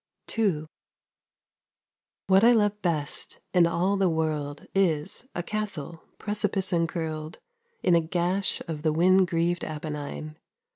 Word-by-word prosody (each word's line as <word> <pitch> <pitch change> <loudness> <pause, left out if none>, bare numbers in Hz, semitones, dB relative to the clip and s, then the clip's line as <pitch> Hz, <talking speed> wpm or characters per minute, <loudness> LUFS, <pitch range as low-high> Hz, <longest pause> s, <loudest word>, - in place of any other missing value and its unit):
II 190 -9 +1 1.6
What 190 +1 +4
I 240 +1 +7
love 210 -2 +1
best 155 -6 -1
in 175 -2 +5
all 185 +4 +1
the 190 -2 +2
world, 150 -3 -2
Is, 175 +3 +1
a 175 - -2
castle, 175 -6 -3 0.2
precipice 205 -3 +1
encurled, 160 -2 -2 0.5
15 - - -5
In 175 - +6
a 165 -1 +1
gash 180 +3 0
of 155 -3 -5
the 155 0 +1
wind 185 +3 +4
grieved 170 +1 0
Apennine. 155 0 -6
170 Hz, 130 wpm, -26 LUFS, 155-195 Hz, 1.6 s, I